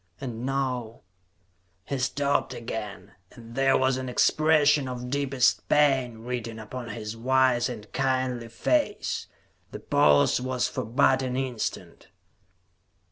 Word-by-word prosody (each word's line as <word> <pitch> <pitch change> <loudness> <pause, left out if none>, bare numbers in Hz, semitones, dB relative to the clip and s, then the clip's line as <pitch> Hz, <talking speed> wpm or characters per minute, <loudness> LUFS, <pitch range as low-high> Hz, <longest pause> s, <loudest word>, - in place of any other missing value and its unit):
And 125 -2 -5
now 130 -4 -2 0.4
" 90 +1 -43
He 140 - -3
stopped 140 +2 0
again, 105 -4 -6 0.2
and 115 -1 -13
there 135 +1 +3
was 130 0 +1
an 130 -1 -4
expression 150 +1 +3
of 125 0 -6
deepest 135 -3 +1
pain 130 -6 +2
written 120 -2 -4
upon 115 +2 -7
his 105 0 -6
wise 130 +1 +2
and 110 -4 -7
kindly 130 -3 -1
face. 210 - -1 0.4
The - - -7
pause 75 +10 +3
was 130 -2 -1
for - - -4
but 130 +3 +3
an 130 -1 -2
instant. 130 -4 -4
125 Hz, 130 wpm, -26 LUFS, 115-135 Hz, 0.4 s, there